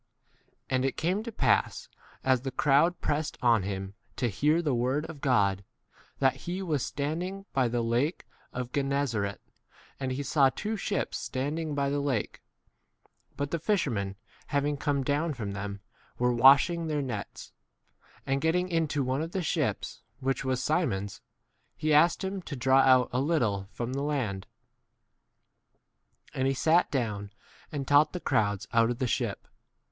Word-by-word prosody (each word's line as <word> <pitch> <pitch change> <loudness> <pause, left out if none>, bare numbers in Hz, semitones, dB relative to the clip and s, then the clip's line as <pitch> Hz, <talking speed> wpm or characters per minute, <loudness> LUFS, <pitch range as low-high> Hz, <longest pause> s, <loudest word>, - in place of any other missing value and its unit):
And 130 -1 0
it 135 - -1
came 180 +6 0
to 230 +1 -6
pass, - - +1 0.4
as 130 -2 +3
the 135 - -3
crowd 150 +6 +3
pressed 150 +1 -1
on 115 -3 +4
him 95 0 -4 0.2
to 120 - 0
hear 150 - +2
the 155 -5 0
word 130 +5 0
of 155 -4 -9
God, 100 -7 +2 0.5
that 135 -1 +3
° - - -18
he 180 +3 -4
was 155 -7 0
stand 150 +4 -2
2 180 - -2
ing 195 +1 -8
by 130 -2 +2
the 120 0 -1
lake 120 +8 0 0.3
of 125 -1 -5
Gennesaret: 135 -8 -1 0.6
and 130 -1 -2
he 135 +3 -2
saw 140 -1 +4
two 215 +10 -3
ships 205 0 -2
standing 145 +3 -3
by 140 -1 0
the 145 - 0
lake, 135 -7 -2 1.0
but 145 +1 -2
the 170 - -1
fishermen, 130 - 0 0.3
having 145 0 0
come 140 -1 0
down 150 +3 0
from 105 -5 -4
them, 100 0 -5 0.4
were 125 0 +2
wash 135 +4 +7
3 175 - -3
ing 165 -1 -3
their 150 -2 -1
nets. 115 -6 -6 0.7
And 135 +1 0
getting 180 +3 +1
into 160 -4 0
one 130 +3 -1
of 165 +2 -5
the 190 - -1
ships, - - -2 0.2
which 135 0 -1
was 130 -1 -1
Si 155 +6 +2
mon's, 100 - -3 0.6
he 155 0 +1
asked 170 +6 +4
him 190 0 -3
to 155 - -6
draw 130 +1 +4
out 130 -2 +5
a 125 - +1
little 115 - 0
from 120 +1 -4
the 135 - -2
land; 125 -10 -2 1.9
and 130 0 0
he 135 - +1
sat 165 +6 +3
down 105 -7 -2 0.4
and 140 -3 -4
taught 145 +1 +5
the 180 - -3
crowds 105 - 0
out 115 0 +5
4 - - -2
of 120 - -2
the 130 - -1
ship. 120 - -2
135 Hz, 175 wpm, -29 LUFS, 120-155 Hz, 1.9 s, wash